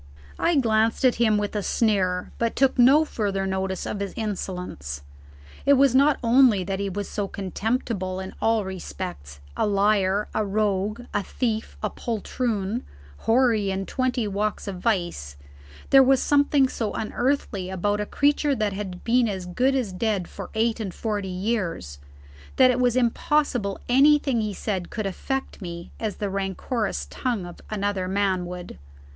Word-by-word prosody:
I 340 - +2
glanced 225 -2 +2
at 250 - +4
him 215 -3 +4
with 205 +1 -2
a 210 - 0
sneer, 190 -4 +1
but 230 -1 0
took 265 -2 +2
no 275 +6 +6
further 200 -8 -2
notice 190 -1 -2
of 205 - -4
his 200 -1 -4
insolence. 180 - -4 0.6
It 280 - +5
was 275 -2 +5
not 280 +2 +5
only 235 -4 +5
that 190 +1 -3
he 200 0 -1
was 200 +1 -4
so 205 -2 -3
contemptible 195 -1 -2
in 190 0 -6
all 225 -2 +2
respects, 180 - -7
a - - +1
liar, 200 0 +2
a 215 - +1
rogue, 205 +1 0
a 205 - +1
thief, 225 +2 -3
a - - 0
poltroon, 225 -1 -2 0.4
hoary 225 -4 +3
in 195 0 -2
twenty 250 -2 -1
walks 205 +1 -2
of 190 -2 -4
vice, 175 - -1 0.5
there 270 - +9
was 265 0 +5
something 285 -1 +3
so 225 -4 -3
unearthly 225 -4 -1
about 205 +3 0
a 210 - -3
creature 290 0 +2
that 215 -4 -1
had 195 -2 -6
been 240 0 +3
as 190 -3 -4
good 250 +9 +1
as 235 -8 -1
dead 200 -2 -1
for 195 - -8
eight 225 +1 +1
and 200 -5 -4
forty 210 -3 -2
years, 180 - -2 0.6
that 255 -1 +6
it 250 - -1
was 245 -1 +2
impossible 245 -3 +1
anything 275 -1 +4
he 210 -2 -3
said 190 -4 -3
could 215 -3 -4
affect 265 +7 -3
me 170 -2 -7
as 215 -3 -2
the 205 - -3
rancorous 195 - -2
tongue 235 -8 -2
of 175 - -10
another 200 -3 -1
man 190 -2 0
would. 180 0 -8
210 Hz, 165 wpm, -25 LUFS, 190-240 Hz, 0.6 s, there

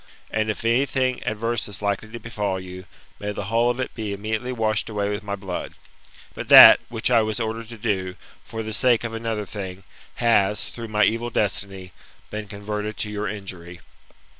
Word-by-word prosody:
And 110 0 0
if 110 - -3
anything 130 +1 +1
adverse 115 +1 -1
is 100 -2 -7
likely 100 +1 -2
to 120 - -7
befall 105 -5 -3
you, 90 0 -9 0.3
may 105 0 -3
the 100 - -4
whole 120 +1 +4
of 120 +1 -2
it 130 - -3
be 110 -3 -4
immediately 110 +5 -3
washed 110 -3 0
away 105 -1 -1
with 105 +1 -3
my 100 -1 -3
blood; 95 -3 -6 0.6
but - - -6
that - - +11
which 115 +1 -1
I 115 -2 +6
was 110 +1 -2
ordered 115 0 -3
to 115 - -9
do, 95 -4 -2 0.3
for 110 0 -6
the 110 0 -5
sake 120 0 +3
of 115 -1 -4
another 115 -2 -3
thing, 95 -2 -7 0.3
has, 105 -2 +2
through 115 -1 -7
my 105 -1 +2
evil 115 +2 +1
destiny, 95 -4 -2 0.4
been 105 0 -5
converted 105 +1 -5
to 105 - -3
your 105 0 -3
injury. 90 -4 -7
110 Hz, 190 wpm, -23 LUFS, 100-115 Hz, 0.6 s, that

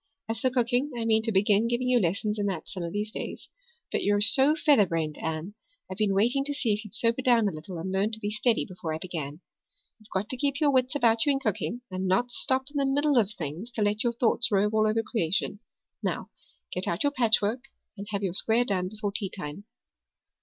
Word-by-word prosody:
As 225 0 -3
for 255 - +2
cooking, 250 +2 +1
I 230 - -2
mean 220 -1 +3
to 225 0 -1
begin 205 +2 +3
giving 240 +2 -1
you 250 -1 +4
lessons 210 +3 -1
in 205 - 0
that 185 -5 -4
some 185 - -6
of 170 -1 -4
these 210 +2 -3
days. - - -7 0.4
But - - 0
you're 205 0 +2
so 265 +8 +6
featherbrained, 170 - +2
Anne, 160 +4 -4 0.4
I've 185 - -6
been 205 -2 +2
waiting 240 +7 +2
to 285 0 -3
see 235 -6 +1
if 210 +2 -3
you'd 215 0 -7
sober 230 +3 +1
down 240 -4 +4
a - - 0
little 165 +3 -8
and 180 +3 -4
learn 195 +2 +1
to 220 - -3
be 205 -1 -3
steady 220 +2 +1
before 170 -4 -5
I - - -3
begin. 160 -3 -6 0.6
You've 215 0 -21
got 195 +2 -1
to 255 - -2
keep 280 +1 -1
your 300 -3 +3
wits 260 0 +1
about 230 -2 +3
you - - +5
in 270 - 0
cooking 230 0 -2
and 185 +1 -2
not 240 +7 +1
stop 260 +2 0
in 290 - -5
the 275 -1 +1
middle 290 +1 +2
of 220 -4 +3
things 170 +3 -6
to 220 - 0
let 205 +1 +2
your 240 -1 +1
thoughts 230 0 +2
rove 205 +1 +2
all 215 0 +3
over 225 +1 +1
creation. 205 -2 -1 0.4
Now, - - -3 0.4
get - - -3
out - - 0
your 285 - +2
patchwork 235 -1 +2 0.3
and 200 -1 -8
have 200 -1 -3
your 185 -3 -1
square 225 +5 +2
done 185 -4 -1
before 210 0 -4
teatime." 195 -4 -5
215 Hz, 230 wpm, -27 LUFS, 195-245 Hz, 0.6 s, so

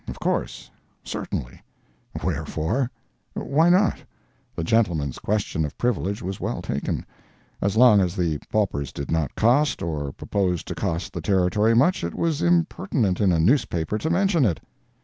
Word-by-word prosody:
Of - - -7
course. - - -2 0.3
Certainly. - - -5 0.6
Wherefore? 100 - -1 0.5
Why 160 +5 +2
not? 190 +3 +3 0.6
The 85 - -3
gentleman's 80 - +1
question 100 -6 -1
of 75 - -5
privilege 105 -4 -1
was 95 +1 -4
well - - -3
taken. 70 - -3 0.6
As 100 +2 0
long 115 -4 +7
as 90 0 -1
the 85 -5 0
paupers 95 -10 -1
did 70 - -6
not 80 -4 -1
cost, 130 +7 +2
or 75 -4 -3
propose 90 +2 -1
to - - -5
cost 85 +1 -3
the 85 - -4
Territory 95 +5 +2
much, 140 - +3
it 85 - -3
was 165 -2 0
impertinent 170 - +1
in 100 -3 +4
a 85 - +2
newspaper 100 - +1
to 160 - -2
mention 175 -2 +2
it. 95 -9 +1
100 Hz, 150 wpm, -24 LUFS, 85-130 Hz, 0.6 s, long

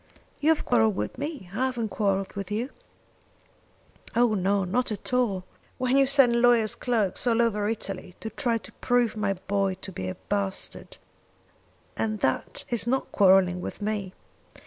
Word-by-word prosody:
"You 295 - +2
have 320 - +2
quarrelled 225 -4 +3
with - - -4
me. 290 - -5
I 255 +5 +1
haven't 235 -4 -2
quarrelled 195 -2 0
with 200 -1 -5
you." 225 +6 -2 1.4
"Oh 240 -2 +4
no; 195 0 +1
not 220 +7 0
at 215 +4 -5
all! 220 -7 +1 0.3
When 255 0 +1
you 275 -1 +5
send 255 -4 +4
lawyer's 235 -3 +4
clerks 230 -2 -1
all 230 -1 +3
over 210 -3 +2
Italy 195 -4 -5
to 220 - -6
try 235 -2 0
to - - -12
prove 245 -2 +1
my 205 -2 0
boy 195 0 -1
to 190 +1 -8
be 95 - -5
a 95 - -4
bastard, 200 -1 -3 1.0
and 215 -1 -1
that 130 - -1
is 235 -1 +3
not 265 +2 0
quarrelling 185 -2 +4
with - - -6
me! 205 -3 -3
215 Hz, 165 wpm, -26 LUFS, 195-245 Hz, 1.4 s, you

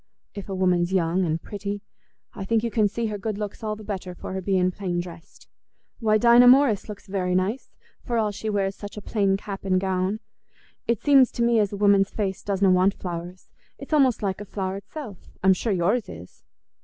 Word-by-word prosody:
If 200 -1 -8
a 195 - -3
woman's 180 -1 +1
young 180 0 +1
and 160 0 -1
pretty, 205 +2 -6 0.5
I 195 - -6
think 225 +2 +1
you 235 - -1
can 215 -2 +3
see 230 +3 -3
her 210 -2 -3
good 215 0 -3
looks 210 +1 -5
all 215 -1 -2
the 215 - -11
better 190 -3 -5
for 185 - -7
her 190 - -3
being 185 -1 +1
plain 180 -2 -3
dressed. 170 -1 -10 0.5
Why, 215 -3 +3
Dinah 240 +2 +6
Morris 250 -5 +5
looks 210 - -8
very 185 -2 -1
nice, 195 +8 -1 0.3
for 240 -2 -2
all 215 -2 +1
she 215 +2 -5
wears 195 -2 -1
such 205 +1 -9
a - - -5
plain 195 -3 +1
cap 195 0 -7
and 185 -1 +2
gown. 190 +2 -1 0.7
It 235 -3 0
seems 275 -3 +5
to 235 - -1
me 235 -1 +3
as 205 -2 +1
a 200 - -5
woman's 200 -1 +4
face 195 -3 -3
doesna 195 -1 +2
want 185 +2 +3
flowers; 175 0 -7 0.3
it's - - -8
almost 265 -7 +3
like 195 0 -2
a - - -6
flower 190 -1 -4
itself. 210 - -9
I'm 190 0 +6
sure 215 +4 -2
yours 200 +5 +1
is." 90 +2 -12
200 Hz, 210 wpm, -24 LUFS, 185-215 Hz, 0.7 s, Dinah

